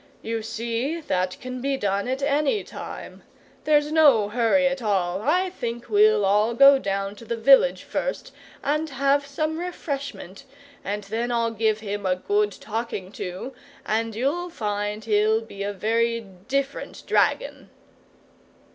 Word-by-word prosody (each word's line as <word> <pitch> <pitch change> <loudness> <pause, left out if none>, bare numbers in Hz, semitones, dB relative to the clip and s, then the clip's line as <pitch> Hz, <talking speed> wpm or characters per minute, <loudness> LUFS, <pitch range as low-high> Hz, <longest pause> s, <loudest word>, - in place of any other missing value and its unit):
"You 225 0 -2
see, 235 +8 -3
that 185 - -2
can 255 0 -6
be 275 +1 0
done 200 -1 -1
at 260 +2 -2
ANY 290 +7 +1
time. - - -9 0.4
There's 295 -1 +3
no 280 -10 +5
hurry 240 +5 +2
at 270 -1 0
all. 190 -4 0
I 360 - +1
think 240 -7 -5
we'll 420 - +4
all 210 +4 +2
go 275 +2 +8
down 195 -2 -2
to - - -12
the 230 +1 -3
village 275 - +5
first, - - -3 0.3
and 305 +3 0
have 280 +1 +1
some 310 +3 -2
refreshment, 280 - -5 0.4
and 205 +1 -3
then 225 +4 -2
I'll 230 -1 +1
give 220 -1 0
him 205 -2 -3
a 185 - +2
good 205 +3 0
talking 215 -4 -5
to, 185 +8 -6 0.3
and 225 0 -1
you'll 300 +10 -1
find 210 -6 -3
he'll 215 0 +3
be 200 -3 -10
a 200 +1 -1
very 230 +3 0 0.3
different 275 0 -3
dragon!" - - 0
230 Hz, 145 wpm, -24 LUFS, 210-280 Hz, 0.4 s, go